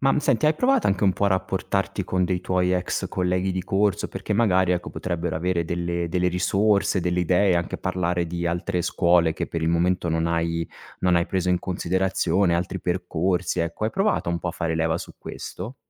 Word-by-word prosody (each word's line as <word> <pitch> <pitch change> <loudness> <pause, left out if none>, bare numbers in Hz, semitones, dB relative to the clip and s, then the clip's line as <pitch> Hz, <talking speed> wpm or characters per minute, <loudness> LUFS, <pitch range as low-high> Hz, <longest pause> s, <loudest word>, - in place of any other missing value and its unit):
Ma, 135 0 +3
mhmm, - - +2
senti, 150 +1 +2
hai 155 - +4
provato 255 - +2
anche 100 +1 0
un 95 - +4
po' 100 +2 -1
a - - +4
rapportarti 95 0 -1
con 90 0 0
dei 90 0 -1
tuoi 90 0 +1
ex 90 -1 -1
colleghi 90 +1 0
di 95 0 -2
corso 95 -1 +1
perché - - -4
magari, 95 -4 +3
ecco, 90 0 -2
potrebbero 85 -2 -3
avere 85 0 0
delle 85 0 -2
delle 90 +1 +1
risorse, 100 +2 +2
delle 90 +1 0
idee, 90 +1 +3
anche 85 - -2
parlare 90 -1 -1
di 85 +1 -3
altre 90 +2 -1
scuole 85 -2 +3
che - - -3
per 85 - -3
il 80 - 0
momento 85 +1 +1
non 80 0 0
hai 85 0 -1 0.3
non 90 -1 +3
hai 85 - +1
preso 90 -2 -1
in 90 -1 +3
considerazione, 95 0 0
altri 90 +2 -2
percorsi, 90 0 -1
ecco. 85 +5 -2
Hai 110 - 0
provato 195 - 0
un 85 - -1
po' 90 - -4
a - - 0
fare 85 -2 -2
leva 80 0 +1
su - - -9
questo? 120 +4 -7
90 Hz, 210 wpm, -24 LUFS, 85-95 Hz, 0.3 s, hai